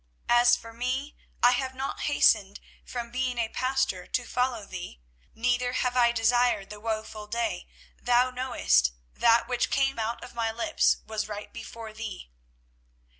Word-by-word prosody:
24:017:016 240 Hz, 0 st, +6 dB
As 240 Hz, -, +6 dB
for 230 Hz, 0 st, -11 dB
me, 255 Hz, +5 st, -3 dB, 0.3 s
I 245 Hz, -, +8 dB
have 260 Hz, +1 st, -1 dB
not 265 Hz, +1 st, -4 dB
hastened 210 Hz, -8 st, +3 dB, 0.2 s
from 235 Hz, -1 st, -6 dB
being 255 Hz, 0 st, -1 dB
a 230 Hz, -2 st, 0 dB
pastor 255 Hz, -9 st, -1 dB
to 245 Hz, -, -1 dB
follow 250 Hz, -4 st, -1 dB
thee: 180 Hz, -, -8 dB, 0.4 s
neither 245 Hz, +1 st, +1 dB
have 250 Hz, -1 st, 0 dB
I 240 Hz, -1 st, +5 dB
desired 235 Hz, -3 st, +2 dB
the 210 Hz, -, -8 dB
woeful 215 Hz, -1 st, -4 dB
day; 235 Hz, +2 st, -2 dB, 0.3 s
thou 245 Hz, +1 st, +3 dB
knowest: 65 Hz, -, +2 dB, 0.2 s
that 230 Hz, 0 st, +4 dB
which 245 Hz, -1 st, 0 dB
came 270 Hz, -2 st, +1 dB
out 225 Hz, +1 st, -2 dB
of -, -, -10 dB
my 230 Hz, -1 st, -1 dB
lips 235 Hz, +8 st, +2 dB
was 215 Hz, -1 st, -3 dB
right 210 Hz, -1 st, -7 dB
before 230 Hz, -1 st, -8 dB
thee. 215 Hz, -, -7 dB
235 Hz, 160 wpm, -27 LUFS, 220-250 Hz, 0.4 s, I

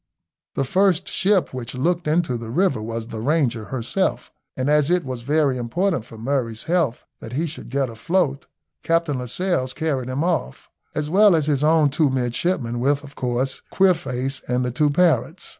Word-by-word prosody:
The 135 Hz, -, +1 dB
first 185 Hz, +4 st, +2 dB
ship 195 Hz, -5 st, +1 dB
which 125 Hz, -1 st, -5 dB
looked 170 Hz, +5 st, 0 dB
into 155 Hz, -4 st, +1 dB
the 115 Hz, -1 st, -6 dB
river 140 Hz, -, +1 dB
was 115 Hz, +1 st, -4 dB
the 110 Hz, -, -5 dB
Ranger 125 Hz, -5 st, +1 dB
herself, 125 Hz, -, -2 dB, 0.3 s
and 130 Hz, +1 st, -1 dB
as 150 Hz, 0 st, +3 dB
it 180 Hz, -3 st, +2 dB
was 130 Hz, -2 st, -5 dB
very 140 Hz, 0 st, +1 dB
important 165 Hz, -, -1 dB
for 115 Hz, -, -12 dB
Murray's 115 Hz, -2 st, -2 dB
health 160 Hz, -8 st, 0 dB
that 115 Hz, -, -9 dB
he 155 Hz, +6 st, 0 dB
should 160 Hz, -5 st, -7 dB
get 135 Hz, +1 st, 0 dB
afloat, 140 Hz, -, -1 dB, 0.3 s
Captain 165 Hz, -5 st, +1 dB
Lascelles 130 Hz, +1 st, -1 dB
carried 140 Hz, -6 st, -2 dB
him 130 Hz, +4 st, -1 dB
off, 170 Hz, -, -2 dB, 0.2 s
as 150 Hz, 0 st, -2 dB
well 200 Hz, 0 st, +6 dB
as 155 Hz, -3 st, +1 dB
his 145 Hz, -2 st, +1 dB
own 155 Hz, -2 st, +4 dB
two 150 Hz, 0 st, +2 dB
midshipmen, 125 Hz, 0 st, -1 dB
with, 140 Hz, +3 st, +1 dB
of 140 Hz, -1 st, -12 dB
course, 125 Hz, +1 st, -2 dB
Queerface 140 Hz, -8 st, +1 dB
and 125 Hz, 0 st, 0 dB
the 125 Hz, -, -1 dB
two 150 Hz, +5 st, +2 dB
parrots. 160 Hz, -1 st, +1 dB
140 Hz, 175 wpm, -22 LUFS, 125-165 Hz, 0.3 s, well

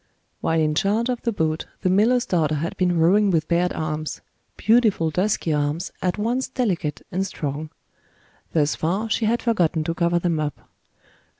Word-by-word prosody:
While 165 Hz, 0 st, +1 dB
in 155 Hz, -1 st, +2 dB
charge 210 Hz, +9 st, +1 dB
of 250 Hz, -2 st, -2 dB
the 235 Hz, -, 0 dB
boat, 160 Hz, -5 st, -1 dB, 0.2 s
the 185 Hz, -, +2 dB
miller's 235 Hz, +6 st, +3 dB
daughter 155 Hz, -4 st, +1 dB
had 160 Hz, +3 st, -3 dB
been 180 Hz, -2 st, +1 dB
rowing 195 Hz, +6 st, +4 dB
with 165 Hz, -4 st, +1 dB
bared 175 Hz, +1 st, +2 dB
arms; 155 Hz, 0 st, -4 dB, 0.4 s
beautiful 215 Hz, -7 st, +3 dB
dusky 180 Hz, -2 st, 0 dB
arms, 150 Hz, +4 st, -1 dB
at 180 Hz, +1 st, 0 dB
once 240 Hz, +5 st, -1 dB
delicate 180 Hz, -, -2 dB
and 185 Hz, +2 st, 0 dB
strong. 155 Hz, -4 st, -4 dB, 0.8 s
Thus 150 Hz, -2 st, +2 dB
far, 195 Hz, +7 st, -2 dB
she 220 Hz, -, +1 dB
had 235 Hz, +2 st, +1 dB
forgotten 175 Hz, -8 st, +1 dB
to 165 Hz, -, -2 dB
cover 170 Hz, 0 st, +1 dB
them 170 Hz, -2 st, 0 dB
up. 150 Hz, -2 st, -4 dB
175 Hz, 170 wpm, -23 LUFS, 155-210 Hz, 0.8 s, rowing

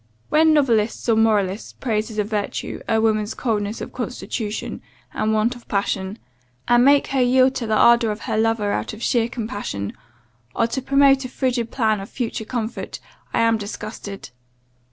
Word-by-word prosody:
When 315 Hz, +1 st, +5 dB
novelists 235 Hz, -8 st, +1 dB
or 225 Hz, -, +5 dB
moralists 210 Hz, -3 st, +1 dB
praise 220 Hz, -3 st, -2 dB
as 220 Hz, -, -9 dB
a 210 Hz, -, +2 dB
virtue, 205 Hz, -1 st, -3 dB
a 225 Hz, -, +3 dB
woman's 215 Hz, -1 st, +1 dB
coldness 215 Hz, -3 st, -2 dB
of -, -, -7 dB
constitution, 240 Hz, -3 st, -4 dB, 0.3 s
and 215 Hz, -, 0 dB
want 220 Hz, +3 st, +1 dB
of 240 Hz, -, -15 dB
passion; 195 Hz, 0 st, -1 dB, 0.5 s
and 240 Hz, 0 st, +5 dB
make 280 Hz, +1 st, +5 dB
her 270 Hz, -2 st, +1 dB
yield 255 Hz, +1 st, +4 dB
to 235 Hz, -, -3 dB
the 215 Hz, -, +1 dB
ardour 235 Hz, 0 st, +5 dB
of 210 Hz, +1 st, -4 dB
her -, -, -2 dB
lover 220 Hz, -2 st, +1 dB
out 105 Hz, -, -2 dB
of 215 Hz, -, -8 dB
sheer 235 Hz, -1 st, +2 dB
compassion, 205 Hz, -, -4 dB, 0.6 s
or 230 Hz, -, +3 dB
to 235 Hz, +3 st, -3 dB
promote 275 Hz, 0 st, +4 dB
a 255 Hz, -, -5 dB
frigid 245 Hz, -3 st, -1 dB
plan 220 Hz, -4 st, +1 dB
of 195 Hz, -, -8 dB
future 230 Hz, -3 st, -4 dB
comfort, 230 Hz, -1 st, -4 dB, 0.3 s
I -, -, +1 dB
am 230 Hz, -1 st, +3 dB
disgusted. 205 Hz, -1 st, -7 dB
225 Hz, 175 wpm, -22 LUFS, 210-245 Hz, 0.6 s, When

